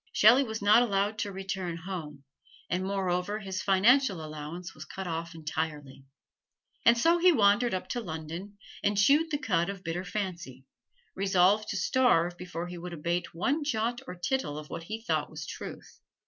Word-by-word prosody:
Shelley 235 +6 +6
was 220 -4 -5
not 210 +3 +7
allowed 205 -1 0
to 205 -3 -2
return 190 -3 -4
home, 160 -5 -7 0.5
and 180 +1 0
moreover 190 0 -1
his 190 -3 -4
financial 200 - +3
allowance 155 +3 -7
was 155 - -9
cut 190 +4 -7
off 165 0 -4
entirely. 150 -4 -4 0.8
And 235 0 +6
so 335 +8 +4
he 360 +1 +6
wandered 215 - +3
up 185 - -4
to 245 - -2
London 170 +3 -7 0.3
and 205 0 +1
chewed 290 +10 +4
the 295 - 0
cud 195 - 0
of 195 -1 -6
bitter 170 +2 -3
fancy, 175 -10 -5 0.5
resolved 195 +2 +3
to 200 - -2
starve 180 -9 +3
before 175 -1 -6
he 175 0 -7
would 175 0 -7
abate 170 +2 -2
one 275 - 0
jot 240 -3 -1
or 180 - -6
tittle 175 - -2
of 150 0 -9
what 165 - -4
he 220 +4 -6
thought - - 0
was - - -7
truth. - - -9
190 Hz, 175 wpm, -29 LUFS, 170-220 Hz, 0.8 s, not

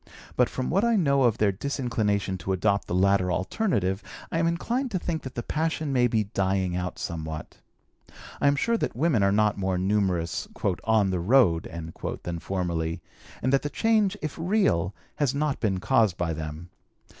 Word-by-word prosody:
But - - +3
from 130 - -3
what 195 +6 +2
I 235 -1 +3
know 140 -8 +3
of 120 -3 +3
their 105 -2 +3
disinclination 105 -4 -1
to 95 +4 -2
adopt 100 +2 +1
the - - -2
latter 95 -1 +3
alternative, 95 - 0 0.3
I 165 - 0
am 165 - +2
inclined 240 +10 -1
to 200 - -1
think 170 -2 -3
that 130 - -8
the 120 - -3
passion 155 -2 -1
may 125 -2 +4
be 110 -2 +1
dying 95 -2 0
out 90 0 -3
somewhat. 80 -2 -6 0.8
I - - +4
am 140 - +4
sure 230 +11 +1
that - - -2
women 140 -4 +2
are 100 0 +4
not 105 0 +2
more 95 -1 0
numerous 95 -3 0 0.4
"on 110 -3 +3
the 90 - 0
road" 90 -4 +3 0.5
than 85 -1 -4
formerly, 85 -2 -2 0.4
and 130 +2 +1
that 135 - +4
the 145 - -3
change, 215 0 +2
if 155 - -3
real, 160 - +1 0.2
has 140 -2 +1
not 145 -1 0
been 100 -5 0
caused 105 -1 +2
by 85 -2 -1
them. 80 +3 -6
105 Hz, 180 wpm, -26 LUFS, 90-145 Hz, 0.8 s, may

